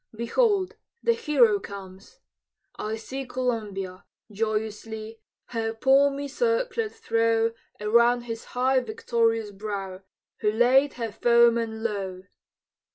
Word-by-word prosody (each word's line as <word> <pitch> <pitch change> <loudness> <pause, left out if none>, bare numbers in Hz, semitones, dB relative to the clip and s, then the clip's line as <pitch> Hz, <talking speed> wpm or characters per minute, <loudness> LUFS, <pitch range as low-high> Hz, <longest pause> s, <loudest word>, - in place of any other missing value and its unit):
Behold 385 - +1 0.3
the 465 - +4
hero 275 - +3
comes! 195 -1 -11 0.5
I 215 +1 -3
see 260 +5 -6
Columbia, 210 -8 -3 0.3
joyously, 220 +1 -3 0.3
Her 225 -1 -2
palmy 275 +3 +3
circlet 465 - 0
throw 230 0 +1 0.3
Around 235 +3 +4
his 230 -1 -6
high 260 +1 +3
victorious 230 - 0
brow 195 -2 -5 0.4
Who 210 - +1
laid 255 +5 +4
her 230 -3 -4
foemen 230 0 +3
low! 195 -4 -3
230 Hz, 100 wpm, -26 LUFS, 215-265 Hz, 0.5 s, the